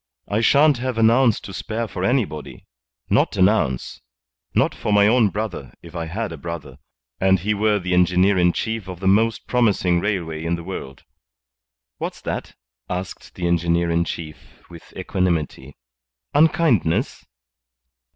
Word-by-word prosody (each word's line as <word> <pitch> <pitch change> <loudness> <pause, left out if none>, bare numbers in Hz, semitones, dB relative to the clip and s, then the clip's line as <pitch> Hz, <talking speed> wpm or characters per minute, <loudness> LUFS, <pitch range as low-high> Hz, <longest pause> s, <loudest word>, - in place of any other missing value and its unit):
"I 105 +2 0
shan't 140 +3 +4
have 130 -1 -3
an 115 0 +5
ounce 120 -2 +3
to 95 - -9
spare 115 +5 -3
for 90 -3 -5
anybody. 95 - -2 0.5
Not - - +2
an 95 - +6
ounce. 65 - -1 0.5
Not - - +2
for - - -3
my 100 0 +5
own 110 0 +4
brother, 95 - -5
if 85 0 -12
I 85 -1 -3
had 105 +4 -4
a 80 - -7
brother, 75 -5 -7 0.4
and 95 0 +4
he 100 +4 -1
were 105 0 +2
the 90 -2 -2
engineer 90 +2 +3
in 90 -1 +3
chief 110 +1 -3
of 90 -2 -7
the 95 - -6
most 110 +4 +2
promising 100 -8 +2
railway 85 -5 -2
in 85 +1 0
the 85 - -8
world." 70 -8 -7 1.0
"What's - - -5
that?" - - -5 0.3
asked 90 +1 -6
the 90 - -4
engineer 85 0 +1
in 85 +1 +2
chief, 80 -2 -8
with 85 -1 -13
equanimity. 85 -7 -2 0.6
"Unkindness?" 145 - +2
95 Hz, 155 wpm, -22 LUFS, 85-110 Hz, 1.0 s, an